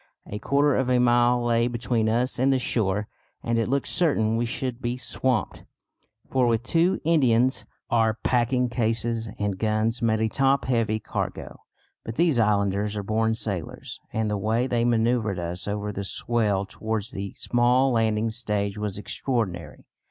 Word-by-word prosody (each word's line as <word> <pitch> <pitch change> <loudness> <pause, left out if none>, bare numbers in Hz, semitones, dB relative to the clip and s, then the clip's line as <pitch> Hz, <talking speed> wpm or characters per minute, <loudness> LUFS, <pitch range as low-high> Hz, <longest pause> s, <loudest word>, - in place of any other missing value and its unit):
A 105 - -6
quarter 140 +3 +2
of 130 -1 0
a 125 - +3
mile 120 0 +3
lay 115 0 +2
between 120 -2 0
us 120 +3 0
and 135 +2 +3
the 135 - +3
shore: 105 -5 -1 0.4
and 115 0 0
it 115 - 0
looked 140 +1 0
certain 115 -10 +2
we 120 +1 0
should 125 +1 -4
be 120 0 -2
swamped, 130 -3 -2 0.6
for, 130 -2 +2
with 115 -1 +1
two 170 +7 +2
Indians, 130 -6 +2 0.3
our 115 -2 +3
packing 125 +2 +1
cases 115 -1 -1
and 100 -2 -2
guns 110 +2 0
made 110 -1 +1
a 110 - +2
top 135 +4 +1
heavy 115 -3 0
cargo. - - -5 0.4
But 115 - -6
these 160 -5 +2
islanders 105 -1 +1
are 100 - -3
born 110 +2 0
sailors, 100 -8 -5
and 110 0 -1
the 105 -1 -1
way 110 +5 +1
they 120 -3 0
manœuvred 115 -3 +1
us 85 +1 -4
over 105 0 -2
the 100 0 -5
swell 105 -1 0
towards 110 +1 -4
the 100 0 -5
small 125 +2 +2
landing 110 -1 +1
stage 105 -3 -2
was 105 -2 -3
extraordinary. 100 - -3
115 Hz, 165 wpm, -25 LUFS, 105-125 Hz, 0.6 s, a